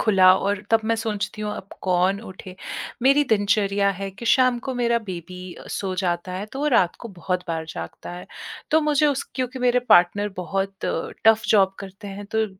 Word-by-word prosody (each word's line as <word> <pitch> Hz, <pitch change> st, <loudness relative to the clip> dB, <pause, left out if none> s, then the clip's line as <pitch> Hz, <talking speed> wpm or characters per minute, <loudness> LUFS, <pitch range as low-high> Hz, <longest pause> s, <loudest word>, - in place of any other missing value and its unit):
खुला 190 Hz, -4 st, +6 dB
और 200 Hz, +1 st, -1 dB
तब 225 Hz, -, +5 dB
मैं 230 Hz, -, +3 dB
सोचती 215 Hz, -1 st, -3 dB
हूँ, 210 Hz, 0 st, -2 dB
अब 195 Hz, -, -9 dB
कौन 185 Hz, +2 st, +2 dB
उठे। 185 Hz, 0 st, -10 dB, 0.5 s
मेरी 280 Hz, +2 st, +5 dB
दिनचर्या 200 Hz, -1 st, +2 dB
है 195 Hz, 0 st, -4 dB
कि 210 Hz, +5 st, -9 dB
शाम 255 Hz, -1 st, +4 dB
को 265 Hz, -2 st, -3 dB
मेरा 235 Hz, -1 st, +2 dB
बेबी 180 Hz, 0 st, -7 dB
अ, -, -, -12 dB
सो 190 Hz, -2 st, -3 dB
जाता 175 Hz, 0 st, -1 dB
है, 195 Hz, +3 st, -4 dB
तो 265 Hz, -, -9 dB
वो 300 Hz, -, 0 dB
रात 180 Hz, -7 st, +3 dB
को -, -, -5 dB
बहुत 180 Hz, +1 st, -2 dB
बार 160 Hz, -1 st, -2 dB
जागता 85 Hz, -, -7 dB
है। 180 Hz, -, -8 dB, 0.4 s
तो 315 Hz, -, +5 dB
मुझे, 300 Hz, -1 st, +3 dB
उस 280 Hz, -2 st, 0 dB
क्योंकि 255 Hz, 0 st, -3 dB
मेरे 250 Hz, 0 st, +3 dB
पार्टनर 205 Hz, +4 st, +5 dB
बहुत 195 Hz, +2 st, -2 dB
टफ़ 225 Hz, 0 st, +2 dB
जॉब 195 Hz, -2 st, +4 dB
करते 195 Hz, +1 st, -9 dB
हैं, 205 Hz, -, -7 dB
तो 220 Hz, +1 st, 0 dB
200 Hz, 195 wpm, -23 LUFS, 185-235 Hz, 0.5 s, खुला